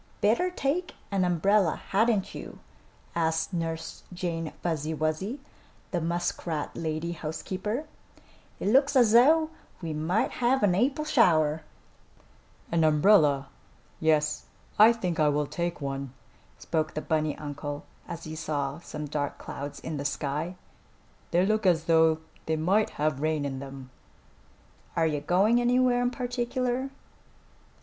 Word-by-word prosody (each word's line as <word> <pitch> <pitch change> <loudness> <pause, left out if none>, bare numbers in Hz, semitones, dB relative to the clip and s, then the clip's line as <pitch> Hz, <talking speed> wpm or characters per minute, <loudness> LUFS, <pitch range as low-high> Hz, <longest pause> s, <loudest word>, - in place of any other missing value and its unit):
"Better 235 - +3
take 355 +1 -2 0.2
an 195 -2 +2
umbrella, 180 +1 +2
hadn't 215 -1 +2
you?" - - -8 0.6
asked 160 +1 0
Nurse 165 -1 -3
Jane 170 -3 -3
Fuzzy 160 -2 -1
Wuzzy, 155 - -2 0.5
the 175 - -1
muskrat 170 -2 -2
lady 160 +1 -2
housekeeper. 190 - -4 0.7
"It - - 0
looks 275 +5 +4
as 240 -5 +6
though 310 +7 +5 0.3
we 165 -3 -4
might 160 +7 0
have 255 +1 +1
an 195 -3 +4
April 270 +10 +1
shower." 160 - +3 1.1
"An 165 -1 +2
umbrella? 150 -3 +4 0.5
Yes, 150 -1 +1 0.3
I 220 +2 +9
think 180 -8 -2
I 150 -1 +4
will 150 0 +1
take 170 +2 -3
one," 135 -2 -4 0.4
spoke 155 -1 -2
the 155 - -1
bunny 155 -1 0
uncle, 145 0 -6 0.2
as 165 - -6
he 155 0 -6
saw 150 -2 -2
some 150 -3 -6
dark 145 -1 -3
clouds 145 +1 -7
in 160 -2 -5
the 140 - -3
sky. 150 +5 -2 0.7
"They 175 +2 +3
look 215 0 +1
as 165 -3 +3
though 160 -1 +4 0.3
they 160 - +1
might 190 +7 +2
have 150 -2 0
rain 155 -2 0
in 135 -1 -3
them." 135 -1 -9 1.0
"Are 165 - +3
you 150 -2 0
going 200 +10 +3
anywhere 245 0 +3
in 245 - +2
particular?" 250 +1 -2
165 Hz, 135 wpm, -28 LUFS, 155-215 Hz, 1.1 s, I